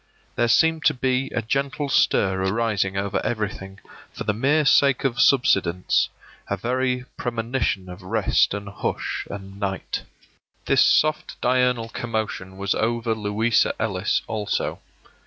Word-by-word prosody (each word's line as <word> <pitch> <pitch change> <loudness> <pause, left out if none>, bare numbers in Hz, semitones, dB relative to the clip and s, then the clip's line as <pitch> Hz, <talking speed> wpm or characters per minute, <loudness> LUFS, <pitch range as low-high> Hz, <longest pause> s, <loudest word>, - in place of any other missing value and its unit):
There 120 - +2
seemed 160 +8 +3
to - - +4
be 130 +1 0
a 115 - -3
gentle 140 +5 -1
stir 95 -7 +2
arising 100 -1 0
over 100 0 -1
everything 100 -3 -4 0.3
for - - -6
the - - 0
mere 145 +7 +2
sake 140 -1 +4
of 125 -3 +1
subsidence 90 -9 +3 0.2
— - - -25
a 100 - -1
very 125 +3 -1
premonition 115 -4 -2
of 90 +2 -9
rest 95 +2 +1
and 100 0 -6
hush 100 - -3
and 95 0 -8
night. 95 -1 -3 0.6
This - - +4
soft 155 0 +2
diurnal 125 -2 +1
commotion 110 -5 -4
was 100 0 0
over 115 0 0
Louisa 110 +1 +1
Ellis 105 -3 0
also. 105 -2 -2
110 Hz, 140 wpm, -23 LUFS, 100-125 Hz, 0.6 s, to